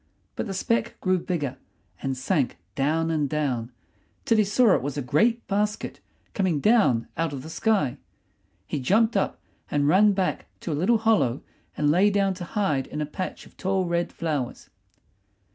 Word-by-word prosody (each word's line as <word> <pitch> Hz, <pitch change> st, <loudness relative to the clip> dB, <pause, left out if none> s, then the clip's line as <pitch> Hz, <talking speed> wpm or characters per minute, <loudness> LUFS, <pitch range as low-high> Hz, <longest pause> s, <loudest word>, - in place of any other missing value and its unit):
But -, -, -3 dB
the 195 Hz, -, -4 dB
speck 230 Hz, +5 st, -1 dB
grew 185 Hz, -1 st, +1 dB
bigger, 145 Hz, -8 st, -3 dB, 0.4 s
and 135 Hz, -1 st, -2 dB
sank 135 Hz, -, 0 dB, 0.2 s
down 160 Hz, +6 st, +1 dB
and 150 Hz, -3 st, 0 dB
down, 130 Hz, -6 st, -1 dB, 0.5 s
till 225 Hz, -2 st, +3 dB
he -, -, +6 dB
saw 210 Hz, +1 st, +4 dB
it -, -, +2 dB
was 145 Hz, +2 st, -4 dB
a -, -, 0 dB
great 225 Hz, -, +2 dB
basket 210 Hz, +2 st, -1 dB, 0.3 s
coming 185 Hz, -7 st, +1 dB
down 200 Hz, -, +3 dB
out 165 Hz, -2 st, -1 dB
of 135 Hz, -2 st, -6 dB
the 160 Hz, -, -8 dB
sky. 200 Hz, -, +1 dB, 0.7 s
He -, -, -3 dB
jumped 220 Hz, -, +2 dB
up -, -, 0 dB, 0.3 s
and 145 Hz, -1 st, +1 dB
ran 205 Hz, +6 st, +5 dB
back 190 Hz, -1 st, -1 dB
to 170 Hz, -, -4 dB
a -, -, 0 dB
little 185 Hz, +11 st, +3 dB
hollow 215 Hz, -, +2 dB, 0.3 s
and 150 Hz, -1 st, +3 dB
lay 190 Hz, +6 st, +4 dB
down 200 Hz, -1 st, +1 dB
to 180 Hz, -1 st, -7 dB
hide 160 Hz, -10 st, 0 dB
in 150 Hz, -, -6 dB
a 150 Hz, -, 0 dB
patch 185 Hz, +5 st, -5 dB
of -, -, -18 dB
tall 190 Hz, 0 st, 0 dB
red 170 Hz, 0 st, -1 dB
flowers. 150 Hz, -7 st, -3 dB
170 Hz, 180 wpm, -25 LUFS, 145-205 Hz, 0.7 s, he